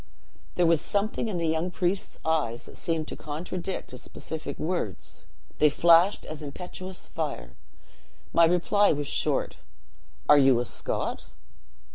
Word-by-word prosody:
There 175 - +3
was 165 -2 +4
something 210 +3 -1
in 190 - -2
the 170 - -1
young 160 +3 0
priest's 180 +2 -2
eyes 150 -8 0
that - - -13
seemed 160 -2 -2
to - - -5
contradict 175 +5 -5
his 125 +1 -10
pacific 160 -1 -6
words; 155 - -3 0.3
they 150 - +6
flashed 170 +6 +5
as 155 0 -7
impetuous 180 +5 -6
fire. 60 - -5 0.8
My 170 - +7
reply 180 +4 +3
was 145 -1 -3
short: - - 0 0.7
'Are 145 - +8
you 135 -3 +5
a 120 - -1
Scot?' - - -3
165 Hz, 140 wpm, -27 LUFS, 145-180 Hz, 0.8 s, Are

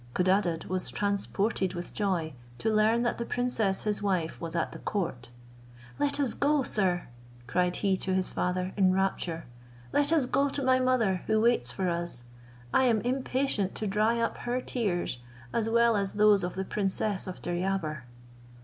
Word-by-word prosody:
Codadad 185 -2 +1
was 185 0 -1
transported 200 -1 -1
with 175 0 -6
joy, 180 -7 -1 0.2
to 220 - 0
learn 220 +2 +3
that 240 - -1
the - - -1
princess 230 -6 0
his 210 -1 +1
wife 185 -5 -1
was 165 0 -5
at 170 - 0
the - - -9
court. 160 - -3 0.7
"Let 290 0 +2
us 270 -5 +1
go, 290 -1 +2
sir," 185 -6 0 0.4
cried 180 +6 +1
he 195 -2 +1
to 190 0 -1
his 190 -1 0
father 180 +1 -1
in 190 -2 +4
rapture, 180 -3 -1 0.5
"let 290 +1 +2
us 315 -5 +3
go 280 +3 +1
to 280 0 -2
my 260 0 +4
mother, 235 -8 +2
who 220 - +3
waits 215 - +2
for 190 +6 -2
us. 170 -8 -3 0.5
I 260 - +4
am 225 -4 +3
impatient 255 -5 0
to 215 - -3
dry 215 +3 +1
up 230 - -1
her 245 +1 -2
tears, 190 - -2 0.3
as 225 -1 0
well 235 0 +4
as 200 -1 -1
those 210 -2 +5
of 180 - -3
the 190 +1 -2
princess 195 0 -1
of 185 - -6
Deryabar." 175 -6 -2
200 Hz, 175 wpm, -29 LUFS, 180-235 Hz, 0.7 s, those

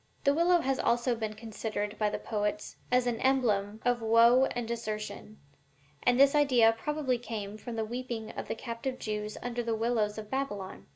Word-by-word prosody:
The 280 - +4
willow 340 +2 +4
has 270 -2 0
always 235 0 +1
been 215 -1 -3
considered 215 -1 -4
by 210 -1 +2
the - - -3
poets 210 -1 -3 0.2
as 250 0 +3
an 240 -2 -1
emblem 220 -6 +1
of 245 -1 +2
woe 230 +3 +6
and 245 -3 -3
desertion, 215 -2 -5 0.6
and 245 0 +3
this 275 0 +7
idea 255 -6 +5
probably 270 0 -1
came 215 -4 -5
from 230 +2 -7
the 220 -1 -1
weeping 235 -1 -5
of - - -6
the - - -2
captive 235 +3 -5
Jews 210 -1 -4
under 245 0 -2
the 230 -1 -1
willows 220 -2 0
of 215 -1 -8
Babylon. 205 -9 -4
230 Hz, 180 wpm, -30 LUFS, 215-250 Hz, 0.6 s, this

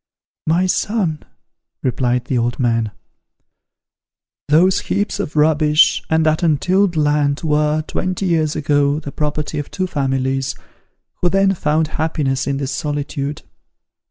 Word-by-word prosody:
"My 170 +4 +3
son," 185 -4 0 0.6
replied 125 -1 0
the 130 - -2
old 120 0 -1
man, 115 -3 +1 1.6
"those 175 +6 +4
heaps 205 0 -2
of 155 -7 -4
rubbish, 150 0 +4
and 160 0 +2
that 155 0 +2
untilled 180 +4 +2
land, 145 -1 +1
were, 150 0 +1
twenty 185 +4 -3
years 160 -4 +1
ago, 145 -1 +1
the 145 -3 -7
property 150 +1 -2
of 145 - -5
two 185 - -2
families, 135 -4 -1 0.7
who 175 - +3
then 195 +1 +3
found 155 -2 0
happiness 145 -4 -1
in 140 -1 0
this 140 -1 -3
solitude. 145 -1 -3
150 Hz, 130 wpm, -19 LUFS, 140-165 Hz, 1.6 s, those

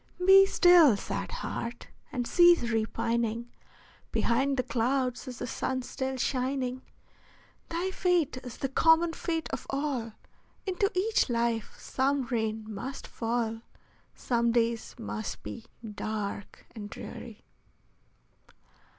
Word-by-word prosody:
Be 390 +1 +8
still, 345 - +6
sad - - -4
heart! 235 +1 -5 0.2
and 245 -3 -2
cease 345 +1 +6
repining; 230 +1 -1 0.6
Behind 270 +4 +1
the 255 - +2
clouds 255 +1 0
is 250 -2 -6
the - - -4
sun 255 +1 -2
still 265 +1 -3
shining; 255 0 -1 0.9
Thy 350 +3 -1
fate 355 -8 +1
is 250 -2 -8
the 270 - -2
common 325 +4 +4
fate 325 -1 -2
of - - -5
all, 270 -5 -2 0.5
Into 395 +1 0
each 405 -3 +2
life 235 -2 -1
some 275 +1 0
rain 220 -2 -1
must 220 +6 -6
fall, 225 -1 -2 0.5
Some 235 -1 +1
days 230 -1 0
must 220 -2 -5
be 230 - -7 0.3
dark 205 -1 -5
and 205 -3 -7
dreary. 225 0 -9
250 Hz, 115 wpm, -29 LUFS, 230-285 Hz, 0.9 s, Be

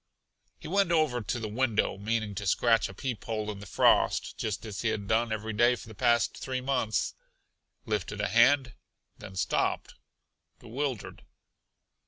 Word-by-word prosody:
He - - -10
went 195 +1 +2
over 155 -7 +2
to 120 +3 -3
the 110 - -4
window, 110 -1 0
meaning 110 +1 -2
to 100 +1 -4
scratch 115 +3 +3
a - - -9
peep 125 -5 -4
hole 110 -2 -2
in 100 - -8
the 100 - -10
frost, - - +3
just 110 0 -3
as 105 -3 -5
he 115 - 0
had 110 -2 -2
done 115 +1 +1
every 110 0 -3
day 120 +3 +4
for 120 - -11
the 110 - -10
past 120 +2 +2
three 130 -1 -3
months; 125 -5 0 0.7
lifted 105 -1 -2
a 105 - +1
hand, 120 +4 +4 0.5
then 95 - -10
stopped - - -1 0.6
bewildered. 125 0 -5
115 Hz, 165 wpm, -29 LUFS, 105-125 Hz, 0.7 s, day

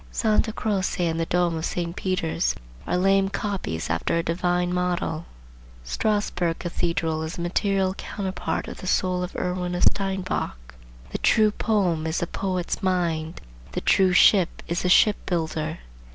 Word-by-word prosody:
Santa 220 0 +1
Croce 195 -4 -1
and 165 0 -1
the 165 - -1
Dome 175 -2 +1
of 160 - -4
St. 170 -1 -3
Peter's 185 -3 0 0.3
are - - +1
lame 195 +1 +3
copies 195 - -3
after 80 - 0
a 170 - 0
divine 175 +1 0
model. 180 -2 -1 0.6
Strasburg 175 - 0
Cathedral 165 -2 -1
is 160 +4 -5
a - - -4
material 190 +2 +1
counterpart 190 -4 -4
of - - -8
the 185 - -7
soul 185 0 +1
of 180 +1 -5
Erwin 180 0 -2
of 175 - 0
Steinbach. 185 - -1 0.4
The - - -3
true 215 -2 +4
poem 185 -8 0
is 160 - -1
the - - 0
poet's 185 +1 -2
mind; 170 -4 -1 0.3
the - - -2
true 190 -1 +4
ship 180 0 +4
is 170 +1 -1
the 180 - 0
ship 205 +3 +6
builder. 160 -2 -1
180 Hz, 155 wpm, -25 LUFS, 165-190 Hz, 0.6 s, ship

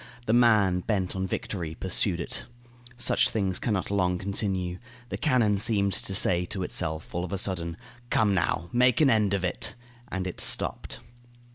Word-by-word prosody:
The 110 - +1
man, 105 -6 +4
bent 95 -1 -2
on 95 0 -2
victory, 85 -4 -4
pursued 95 0 +1
it. - - -4 0.5
Such 120 - +3
things 95 -4 -1
can 115 - -1
not 95 - -3
long 90 -3 +1
continue. 95 -2 -2 0.3
The - - -4
cannon 115 -9 +2
seemed 100 -2 +2
to 95 - -3
say 90 -2 +2
to 95 +1 -4
itself, 80 -2 -2
all 85 - -2
of 90 - -6
a 100 - -2
sudden, 85 -3 -1 0.3
"Come, 105 -2 +2
now! 85 -1 -1
Make 125 0 +3
an 145 -4 +5
end 105 -3 +2
of 95 - -3
it!" 90 - -2 0.3
and 95 -1 -4
it 90 - -1
stopped. - - 0
95 Hz, 175 wpm, -27 LUFS, 90-105 Hz, 0.5 s, an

